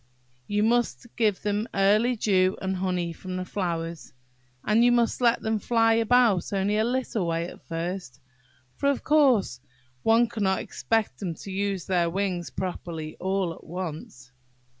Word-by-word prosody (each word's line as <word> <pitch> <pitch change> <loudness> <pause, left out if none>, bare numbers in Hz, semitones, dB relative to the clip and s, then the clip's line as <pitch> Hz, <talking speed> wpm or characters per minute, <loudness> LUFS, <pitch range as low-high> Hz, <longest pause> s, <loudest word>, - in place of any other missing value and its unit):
You 205 0 +1
must 240 +1 0
give 215 -5 +1
them 210 +1 -1
early 210 +5 +3
dew, 190 -4 +2
and 190 0 -2
honey 180 -2 -1
from 185 +2 -6
the 185 - -3
flowers; 170 -4 -4 0.5
and 220 +2 +4
you 245 - +5
must 240 0 +1
let 235 -1 +3
them 220 -1 0
fly 225 +1 +3
about 230 -3 +3
only 200 +1 0
a 215 - +3
little 235 -6 -1
way 165 0 -1
at - - -12
first; 165 -5 -4 0.6
for, 280 - +1
of 280 - -1
course, 260 - +3 0.4
one 230 - +4
can't 200 -4 0
expect 225 -2 -1
them 180 -5 -3
to 195 - -9
use 195 -1 -2
their 175 -3 +1
wings 180 -1 -2
properly 170 -4 -5
all 190 -2 -1
at - - -15
once. 155 -7 -7
195 Hz, 160 wpm, -26 LUFS, 175-225 Hz, 0.6 s, you